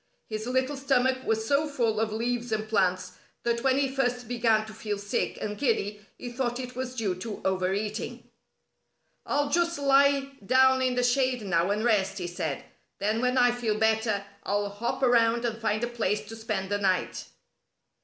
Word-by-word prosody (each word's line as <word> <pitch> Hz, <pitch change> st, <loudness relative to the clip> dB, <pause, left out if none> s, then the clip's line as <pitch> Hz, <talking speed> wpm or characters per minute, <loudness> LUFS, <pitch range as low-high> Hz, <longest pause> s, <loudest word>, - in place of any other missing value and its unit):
His 215 Hz, +1 st, -5 dB
little 260 Hz, +3 st, 0 dB
stomach 260 Hz, -1 st, +1 dB
was 220 Hz, 0 st, +1 dB
so 285 Hz, +4 st, +2 dB
full 235 Hz, -7 st, 0 dB
of 220 Hz, -1 st, 0 dB
leaves 240 Hz, +2 st, -2 dB
and 215 Hz, 0 st, -1 dB
plants 185 Hz, -4 st, 0 dB, 0.2 s
that 235 Hz, 0 st, 0 dB
when 265 Hz, -1 st, +3 dB
he 280 Hz, -1 st, +2 dB
first 245 Hz, -3 st, -1 dB
began 230 Hz, -2 st, +2 dB
to 220 Hz, -, -10 dB
feel 210 Hz, -1 st, -4 dB
sick 200 Hz, +1 st, -2 dB
and 210 Hz, 0 st, -4 dB
giddy 210 Hz, -6 st, 0 dB
he 245 Hz, -, -7 dB
thought 245 Hz, 0 st, -2 dB
it 250 Hz, -1 st, -6 dB
was 255 Hz, 0 st, -4 dB
due 215 Hz, -6 st, 0 dB
to 210 Hz, +3 st, -6 dB
overeating. 190 Hz, +3 st, -2 dB, 1.0 s
"I'll 285 Hz, 0 st, 0 dB
just 340 Hz, +1 st, +1 dB
lie 275 Hz, 0 st, +3 dB
down 260 Hz, +4 st, +4 dB
in 255 Hz, -1 st, +1 dB
the 250 Hz, -, +1 dB
shade 250 Hz, -1 st, +2 dB
now 175 Hz, -2 st, +1 dB
and 210 Hz, +2 st, 0 dB
rest," 195 Hz, -4 st, +2 dB
he 180 Hz, -, -3 dB
said. 160 Hz, -5 st, -4 dB, 0.3 s
"Then 215 Hz, +3 st, 0 dB
when 250 Hz, +1 st, +1 dB
I 245 Hz, -1 st, +5 dB
feel 235 Hz, -3 st, -1 dB
better 220 Hz, -2 st, +1 dB, 0.2 s
I'll 205 Hz, 0 st, -1 dB
hop 220 Hz, +6 st, -3 dB
around 235 Hz, -1 st, +4 dB
and 230 Hz, -1 st, -3 dB
find 215 Hz, 0 st, 0 dB
a -, -, +1 dB
place 215 Hz, -3 st, -1 dB
to 225 Hz, -, -7 dB
spend 205 Hz, -3 st, -3 dB
the 205 Hz, -, +1 dB
night." 190 Hz, -2 st, 0 dB
230 Hz, 185 wpm, -27 LUFS, 210-255 Hz, 1.0 s, I